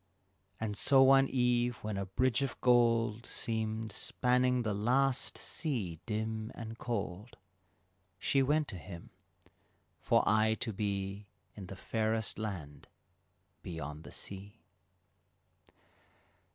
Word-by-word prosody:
And 110 -2 -2
so 135 +5 +5
one 135 0 +6
eve 125 -1 +2
when 105 -1 -2
a 100 -1 -3
bridge 125 +6 +1
of 135 -3 -2
gold 115 -2 +3
Seemed 110 -2 -3
spanning 125 +3 +1
the 110 -2 0
last 125 +6 +1
sea 110 - -3
dim 110 0 -2
and 115 0 -7
cold, 105 -2 -4 0.8
She 135 +7 +2
went 150 +3 +2
to 95 - -6
him, 85 +3 -10 0.9
for - - +3
aye 110 +1 +3
to 115 - -2
be 100 0 -3 0.3
In 100 -3 -9
the 95 - -7
fairest 110 +1 -1
land 80 -10 -6 0.7
beyond 75 -3 -6
the - - -11
sea. 100 +3 -7
110 Hz, 115 wpm, -33 LUFS, 100-125 Hz, 0.9 s, one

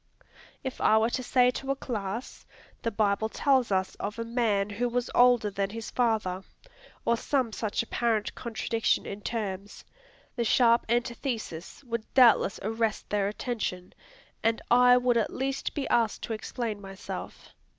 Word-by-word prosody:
If 265 -1 -5
I 220 - +5
were 225 +2 +2
to 255 - -1
say 250 0 +3
to 270 +2 -6
a 275 - +2
class, 225 -3 -5 0.3
"The 230 - 0
Bible 215 0 +1
tells 260 -2 +2
us 190 -1 +1
of 210 +2 -4
a 230 - -2
man 220 -4 0
who 240 +4 -1
was 245 0 -2
older 245 -4 +5
than 195 0 -1
his 225 +1 -7
father," 215 -6 0 0.6
or 235 - +3
some 250 -1 -1
such 215 +1 -1
apparent 230 -2 0
contradiction 230 -1 -1
in 200 +1 -6
terms, 205 -3 -5 0.5
the 240 - 0
sharp 235 0 +4
antithesis 235 - -3
would 235 -3 -5
doubtless 240 -6 +5
arrest 225 +1 -2
their 205 -1 +1
attention, 205 -4 -4 0.5
and 225 0 +1
I 250 +1 +7
would 245 -1 +2
at 225 - 0
least 270 +1 -3
be 285 - -2
asked 230 -2 +1
to 230 - -3
explain 220 -1 -4
myself. 195 0 -8
230 Hz, 155 wpm, -28 LUFS, 210-245 Hz, 0.6 s, I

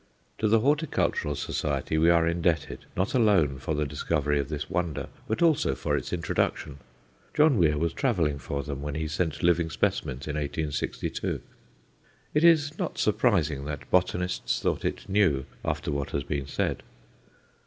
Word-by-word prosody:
To 110 - +2
the 110 +1 +4
Horticultural 145 - +1
Society 75 +2 -2
we 80 +2 +4
are 85 -1 +4
indebted, 85 -2 0
not 95 +3 0
alone 95 - +3
for 75 +4 -2
the 75 0 0
discovery 75 0 0
of 70 0 -2
this 75 -1 -4
wonder, 85 -4 -2 0.2
but 110 +10 0
also 150 - +3
for - - -1
its - - -3
introduction. 70 -1 -1 0.6
John 150 -2 +5
Weir 75 -3 +3
was 85 +2 0
travelling 85 - 0
for 70 +2 -4
them 70 -2 -5
when 75 0 -4
he 80 0 -2
sent 80 -1 -2
living 85 -1 +3
specimens 65 -3 -1
in 75 - -2
1862. 75 0 -2 0.9
It 150 - +2
is 155 -3 +5
not - - -3
surprising 95 - +1
that 70 -2 -6
botanists 90 0 +1
thought - - -1
it - - -3
new 95 -10 +2 0.2
after - - -2
what 70 -1 -2
has 70 - 0
been 70 -2 -3
said. - - -1
80 Hz, 160 wpm, -27 LUFS, 70-100 Hz, 0.9 s, John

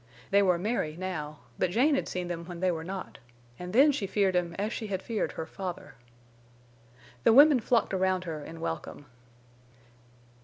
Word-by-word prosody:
They 200 +1 +5
were 180 -3 +3
merry 175 -5 -2
now; 155 -5 -5 0.2
but 185 - +2
Jane 255 - +3
had 275 - 0
seen 180 -1 -3
them 170 -1 -5
when 175 -1 -8
they 185 0 +2
were 160 -2 -4
not, 190 +2 -7 0.4
and 180 0 -6
then 275 +8 +6
she 240 -8 -3
feared 195 -1 +1
him 175 -1 0
as 210 +3 -2
she 220 - -4
had 190 -2 -2
feared 220 +2 -3
her 160 - -5
father. 180 +1 -7 1.3
The - - +5
women 285 +1 +8
flocked 230 -2 +1
around 185 -1 +1
her 160 -4 -5
in 165 +1 -9
welcome. 165 -3 -5
185 Hz, 180 wpm, -29 LUFS, 170-210 Hz, 1.3 s, women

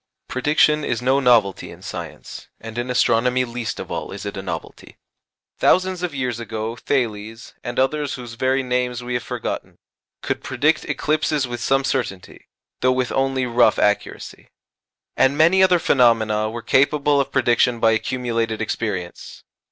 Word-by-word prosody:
Prediction 150 +3 +2
is 125 -4 -1
no 130 +3 +2
novelty 115 -7 +3
in - - -13
science; - - -8
and 115 0 -9
in 120 +1 -3
astronomy 125 +1 +2
least 120 -2 -5
of - - -7
all - - -4
is 100 +1 -7
it 100 - -5
a 95 - -4
novelty. 85 -4 -7 0.6
Thousands 185 -1 +2
of 175 -5 -3
years 125 -3 -2
ago, 110 0 -4
Thales, 115 -4 -3
and 120 0 -5
others 145 +2 0
whose 120 -2 -8
very 130 +3 0
names 125 -1 -1
we 125 0 -4
have 120 - 0
forgotten, - - -5 0.5
could - - -2
predict 155 +2 +1
eclipses 150 -2 0
with 120 -1 -6
some 135 +3 +2
certainty, 120 -9 -4 0.3
though 130 - +3
with 130 -1 0
only 135 -1 0
rough 120 -2 +3
accuracy. 105 0 -1 0.7
And 135 +2 +3
many 170 +5 +5
other 185 -1 +5
phenomena 110 -7 +2
were 115 +1 -7
capable 140 +1 +3
of 135 - -4
prediction 120 -2 +2
by 115 0 +4
accumulated 115 -1 -1
experience. 100 -5 -4
125 Hz, 155 wpm, -21 LUFS, 115-135 Hz, 0.7 s, many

